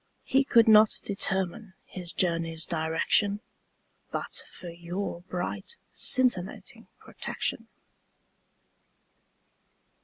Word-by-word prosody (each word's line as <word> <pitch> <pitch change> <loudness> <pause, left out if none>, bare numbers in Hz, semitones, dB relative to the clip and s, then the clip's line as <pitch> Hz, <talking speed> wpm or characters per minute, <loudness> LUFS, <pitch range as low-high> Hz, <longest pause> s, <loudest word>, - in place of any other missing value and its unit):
He 270 +1 +2
could 235 -4 +4
not 215 -1 +6
determine 190 0 -1
his 180 -2 -8
journey's 165 -2 +1
direction 170 +5 +1 0.7
But - - -3
for 180 - -9
your 175 +2 -5
bright 195 - -4
scintillating 240 -8 +1
protection. - - -4
190 Hz, 80 wpm, -27 LUFS, 170-215 Hz, 0.7 s, not